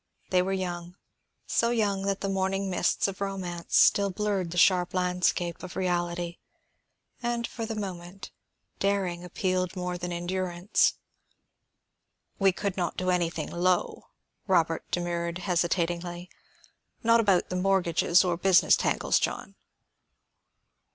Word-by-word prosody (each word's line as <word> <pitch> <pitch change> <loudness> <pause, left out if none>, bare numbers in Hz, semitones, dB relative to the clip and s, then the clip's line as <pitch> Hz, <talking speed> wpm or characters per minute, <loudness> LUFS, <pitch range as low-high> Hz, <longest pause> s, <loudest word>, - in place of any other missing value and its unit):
They 180 -1 +4
were 190 +1 -2
young; 175 -2 -4 0.5
so 235 - +1
young 210 -5 +1
that 195 -1 -1
the 195 - -1
morning 195 0 -1
mists 180 +2 +1
of 195 0 -6
romance 185 -3 -2
still 200 0 +5
blurred 195 -2 -1
the 175 - -6
sharp 180 0 +4
landscape 180 -1 0
of 185 - -8
reality, 175 -2 -2 0.8
and 240 -1 -1
for 230 -1 -5
the 225 - -4
moment, 185 -2 -7 0.5
daring 190 -3 0
appealed 185 0 -1
more 180 -1 -3
than 175 0 -4
endurance. 175 +1 0 1.4
"We 195 -1 +5
could 200 +1 -3
not 175 -3 -2
do 185 0 0
anything 175 -2 -1
low," 180 +1 0 0.4
Robert 165 -4 +1
demurred 170 -1 -2
hesitatingly. 175 -1 -1 0.7
"Not 230 0 +5
about 195 -5 +2
the 180 - -3
mortgages 180 -2 +3
or 175 -2 0
business 185 0 +5
tangles, - - +1
John." - - -3
180 Hz, 125 wpm, -27 LUFS, 175-195 Hz, 1.4 s, still